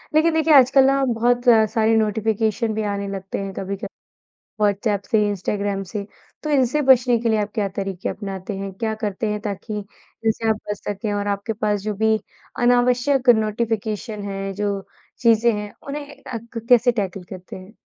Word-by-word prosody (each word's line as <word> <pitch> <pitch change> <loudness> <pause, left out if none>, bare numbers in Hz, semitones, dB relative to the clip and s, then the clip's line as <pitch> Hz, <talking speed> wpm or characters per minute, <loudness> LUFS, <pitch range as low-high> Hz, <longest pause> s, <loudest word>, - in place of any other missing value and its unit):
लेकिन 320 +1 +4
देखिए 320 -1 +3
आजकल 270 0 +7
ना 275 0 +3
बहुत 240 +2 +2 0.3
सारी 225 0 +2
नोटिफ़िकेशन 220 +1 0
भी 220 - -2
आने 200 0 -3
लगते 195 -1 -5
हैं 195 -1 -5
कभी-कभी, 195 +2 -4 0.7
व्हाट्सऐप 205 0 +1
से 215 -2 +3
इंस्टाग्राम 200 0 -2
से। 200 -1 -4 0.4
तो 305 - -3
इनसे 280 +1 +2
बचने 250 -3 +5
के 235 - -1
लिए 220 -1 +2
आप 205 - -4
क्या 205 -3 0
तरीके 195 -2 -3
अपनाते 195 -1 -5
हैं? 195 0 -5
क्या 220 +3 -2
करते 210 +1 -2
हैं 210 - -2
ताकि 210 +1 -4 0.5
इनसे 225 0 +1
आप 220 - +3
बच 205 - -1
सकें? 205 +1 -3
और 205 0 -2
आपके 200 +2 -2
पास 210 -1 +1
जो 210 0 -2
भी 220 0 +4 0.5
अनावश्यक 250 +2 +3
नोटिfiकेशन 215 0 -2
है, 195 0 -4
जो 200 0 -2 0.4
चीज़ें 230 0 +4
हैं 210 0 -6 0.2
उन्हें 285 0 -5
अ, 255 -3 -5 0.2
क 230 0 -6
कैसे 245 0 +5
टैकल 195 -4 -3
करते 185 -1 -9
हैं? 185 +2 -12
215 Hz, 175 wpm, -22 LUFS, 200-240 Hz, 0.7 s, आजकल